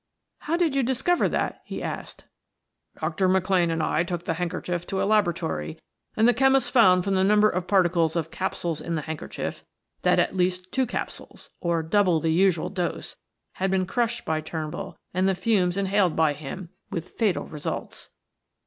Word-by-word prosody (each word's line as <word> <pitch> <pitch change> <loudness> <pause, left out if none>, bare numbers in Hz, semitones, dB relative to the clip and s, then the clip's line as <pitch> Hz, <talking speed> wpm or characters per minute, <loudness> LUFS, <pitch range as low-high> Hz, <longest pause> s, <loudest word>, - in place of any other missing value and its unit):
"How 330 +3 -1
did 330 -5 +1
you 275 - +3
discover 265 +8 +1
that?" - - -2
he - - -6
asked. - - -6 0.8
"Dr. 190 -1 0
McLane 185 -2 +2
and 165 -1 -1
I 155 - +1
took 175 -1 -4
the - - 0
handkerchief 175 +1 -3
to 190 - -2
a - - +1
laboratory 165 - 0 0.4
and 220 +2 +5
the 245 - +5
chemist 270 +2 +3
found 185 -8 +5
from 195 +1 0
the 190 0 +3
number 210 +2 +5
of 180 -3 -2
particles 175 -4 +3
of 165 -1 -2
capsules 170 -4 -3
in 170 - -3
the 155 - -2
handkerchief, 160 +1 -5 0.4
that - - +3
at - - +1
least 185 0 0
two 260 -1 +1
capsules - - -6
or 170 -2 0
double 180 0 +3
the 160 0 +1
usual 180 -1 +2
dose 180 -3 -3 0.4
had 190 +1 -2
been 190 -1 +1
crushed 235 +4 -1
by 155 -1 0
Turnbull 155 -1 -5 0.2
and 185 +1 +2
the 190 - +1
fumes 185 -2 +1
inhaled 195 -3 +2
by 160 -2 +3
him; 155 +5 -7 0.2
with 170 -2 -5
fatal 215 -6 0
results." 150 -2 -6
185 Hz, 175 wpm, -25 LUFS, 165-205 Hz, 0.8 s, and